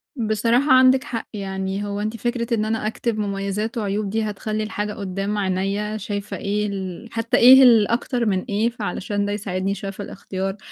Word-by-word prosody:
بصراحة، 230 +3 +1
عندِك 260 0 +6
حق، 230 -2 -5
يعني 195 -1 -3
هو 205 0 -3
أنتِ 215 +2 -3
فكرة 240 +1 -2
إن 215 -2 +1
أنا 220 -1 -1
أكتب 225 0 -2
مميزات 200 +2 -2
وعيوب، 205 -1 -1
دي 220 +2 -1
هتخلِّي 215 +1 -3
الحاجة 210 -1 -3
قدَّام 200 +1 -3
عينيَّا، 200 +2 -1
شايفة 205 0 -4
إيه 210 +1 -1
ال 190 +1 -5
حتى 230 -1 0
إيه 260 +2 +9
ال 230 -5 +6
أكتر 240 +1 -1
من 190 -4 +1
إيه، 215 +3 +1
فعشان 205 -3 -3
ده 205 - -2
يساعدني 195 -1 -2
شوية 195 -1 -5
في 200 +1 -7
الاختيار، 195 0 -5
210 Hz, 180 wpm, -22 LUFS, 200-225 Hz, -, إيه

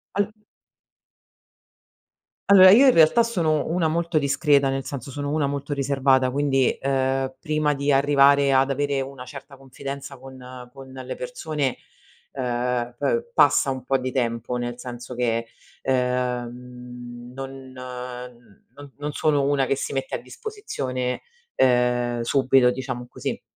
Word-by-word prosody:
Allo 205 0 +1 2.2
allora 190 -1 +9
io 265 +6 +7
in 255 - +6
realtà 165 +9 +5
sono 165 -10 0
una 165 0 +1
molto 170 0 -1
discreta, 140 0 +2
nel 135 0 -2
senso 140 0 -7
sono 145 +1 -4
una 150 -2 +1
molto 140 +1 -3
riservata, 135 -2 +2
quindi, 135 -1 +2
ehm, 135 -1 -1
prima 155 -2 0
di 140 +1 -2
arrivare 140 0 +4
ad 135 +1 +3
avere 140 0 0
una 135 -1 -6
certa 140 +2 -11
confidenza 135 +1 -8
con 130 -1 -11
con 135 -1 -12
le 130 -1 -7
persone, 155 - -3 0.6
ehm, 120 -1 -2
pe 475 0 -1
passa 140 - +4
un 130 -2 -5
po' 135 +1 +2
di 130 0 -4
tempo 120 -1 -2
nel 120 0 -4
senso 125 0 -8
che, 115 -1 0 0.4
ehm, 125 -1 -3
non 135 0 -6 0.2
n - - -15 1.0
non 145 -1 -12
non 145 +1 -4
sono 145 -3 +1
una 140 -1 +2
che 135 - 0
si - - -4
mette 135 0 -3
a - - -1
disposizione, 130 - -4 0.3
ehm, 125 -1 +2
subito 130 -1 +3
diciamo 130 -2 -5
così. - - -5
135 Hz, 140 wpm, -23 LUFS, 125-145 Hz, 2.2 s, allora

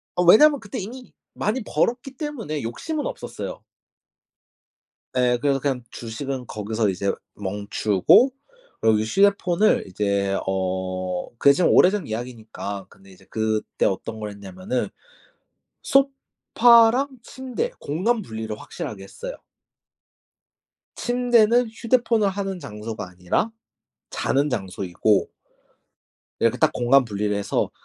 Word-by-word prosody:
어 180 - +2
왜냐면 285 - +7
그때 225 +2 -6
이미 245 +6 -8 0.2
많이 230 +5 -1
벌었기 245 +5 -1
때문에 230 - -4
욕심은 295 - -4
없었어요. - - -6 1.5
네. 125 -1 +2
그래서 140 -2 +2
그냥 130 -2 -2
주식은 125 +3 -5
거기서 110 0 -1
이제 95 +1 -1 0.2
멈추고 105 - +3 0.5
그리고 110 -1 +4
이 - - 0
휴대폰을 200 - +3
이제 100 0 0
어 95 -1 -2
그게 140 +2 +6
좀 180 - +2
오래전 190 -2 +4
이야기니까 110 -4 -6
근데 95 0 -18
이제 95 +1 -18
그때 110 -1 -1
어떤 110 +3 -2
걸 105 -1 -4
했냐면은 100 +4 -4 0.9
소파랑 255 -2 +4
침대 260 - -4
공간 215 +11 0
분리를 110 - -6
확실하게 100 -2 -7
했어요. - - -8 1.6
침대는 245 -1 +3
휴대폰을 225 -2 +1
하는 195 -1 -4
장소가 105 - -6
아니라 90 - -1 0.6
자는 145 +2 0
장소이고 95 -2 0 1.1
이렇게 115 +2 +2
딱 - - +3
공간 130 +2 +4
분리를 105 -1 -2
해서 100 - -1
125 Hz, 265 characters per minute, -23 LUFS, -, 1.6 s, 왜냐면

